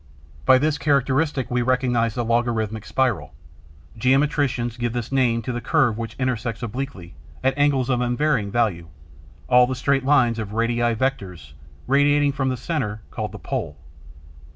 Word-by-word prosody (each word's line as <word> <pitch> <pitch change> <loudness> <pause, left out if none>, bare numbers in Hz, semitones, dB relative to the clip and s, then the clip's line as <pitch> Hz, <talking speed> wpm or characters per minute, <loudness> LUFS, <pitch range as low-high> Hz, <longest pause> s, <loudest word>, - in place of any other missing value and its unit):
By 130 - +7
this 150 +2 0
characteristic 140 -1 +1
we 125 0 +1
recognize 120 -2 +1
the 120 -2 -2
'logarithmic 115 -2 -1
spiral.' 110 - -1 0.6
Geometricians 130 -1 +1
give 120 -1 -2
this 120 0 -4
name 120 -4 +1
to 125 - -3
the 120 0 -4
curve 125 -4 +2
which 115 -1 -6
intersects 120 -3 -2
obliquely, 115 -7 -6 0.3
at 130 0 +2
angles 145 -3 +2
of 125 -2 +1
unvarying 125 -3 0
value, 100 -7 0 0.6
all 125 0 +5
the 130 - -2
straight 135 +2 +1
lines 125 -5 +3
or 110 - -2
'radii 115 +2 0
vectores' 95 - -3 0.3
radiating 145 +2 +3
from 135 -1 -1
a 130 - -3
centre 120 -8 -3
called - - -4
the - - -8
'Pole.' 75 0 -4
125 Hz, 150 wpm, -22 LUFS, 115-135 Hz, 0.6 s, By